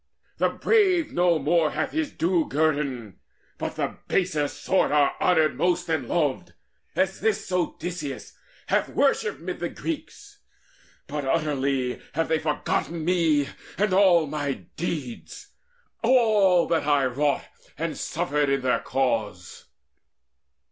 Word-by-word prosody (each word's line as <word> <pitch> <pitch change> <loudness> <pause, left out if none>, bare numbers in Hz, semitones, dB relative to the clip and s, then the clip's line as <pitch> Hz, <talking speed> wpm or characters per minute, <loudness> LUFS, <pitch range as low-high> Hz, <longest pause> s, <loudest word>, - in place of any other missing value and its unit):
The - - +3
brave 375 -8 +2
no 175 -1 +3
more 155 +2 +2
Hath 155 +1 -2
his 315 -2 -1
due 170 -1 0
guerdon, 140 - -1 0.4
but - - -4
the - - -3
baser 165 -6 +1
sort 185 +4 0
Are 145 -1 +3
honoured 160 -6 +3
most 175 +4 0
and 150 -7 -1
loved, 150 -4 -1 0.4
as 190 0 0
this 215 -3 -1
Odysseus 175 -5 -3 0.3
Hath - - +1
worship - - +1
mid - - -5
the - - -2
Greeks: - - -7 0.7
but 145 0 -4
utterly 135 -3 0
Have 165 +1 0
they 160 - +2
forgotten 155 +1 -2
me 160 -5 +2 0.3
and 205 -1 +1
all 185 -4 +5
my 145 -2 -4
deeds, 150 -8 -5 0.5
All 215 -8 +4
that 165 -3 0
I 145 -2 +3
wrought 140 +3 0 0.3
and - - -3
suffered 145 +1 -1
in 140 0 +1
their 130 -1 +1
cause." 115 -9 -2
155 Hz, 125 wpm, -25 LUFS, 140-180 Hz, 0.7 s, all